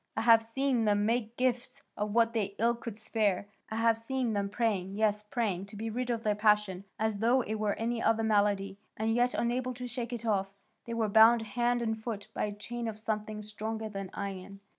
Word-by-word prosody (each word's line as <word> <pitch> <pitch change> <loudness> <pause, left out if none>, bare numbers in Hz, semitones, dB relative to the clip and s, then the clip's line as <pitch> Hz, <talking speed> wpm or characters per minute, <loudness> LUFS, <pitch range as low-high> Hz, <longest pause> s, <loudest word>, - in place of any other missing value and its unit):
I - - +2
have 230 0 +7
seen 240 +1 0
them 205 -1 +2
make 230 0 -1
gifts 255 +2 -1
of 210 0 -2
what 230 +1 +3
they 200 -3 -1
ill 235 +2 +3
could 230 -2 -7
spare, 210 -3 0 0.2
I 220 - -4
have 225 0 +3
seen 245 0 -1
them 200 -1 -1
praying, 200 -4 -1
yes, 210 -1 +1
praying, 210 -3 -2
to 200 - -12
be 220 +2 -4
rid 250 +2 -3
of 230 -2 -1
their 210 - +2
passion, 210 -2 +2
as 220 -2 -1
though 240 +4 +4
it 220 -2 -3
were 210 -1 0
any 230 +1 -2
other 225 -1 +2
malady, 205 -2 +1 0.2
and 220 +1 0
yet 245 +1 +2
unable 250 +1 -1
to 250 +1 -6
shake 245 0 -4
it 235 -1 -5
off; 195 -3 +1 0.4
they 235 - -4
were 225 -2 +1
bound 225 +2 +6
hand 240 +3 0
and 220 -1 -2
foot 220 -3 -5
by - - -1
a 210 - -3
chain 235 +3 -5
of 220 -1 -4
something 215 -1 -3
stronger 220 +1 -4
than 195 -2 -5
iron. 195 0 -6
220 Hz, 215 wpm, -30 LUFS, 210-235 Hz, 0.4 s, have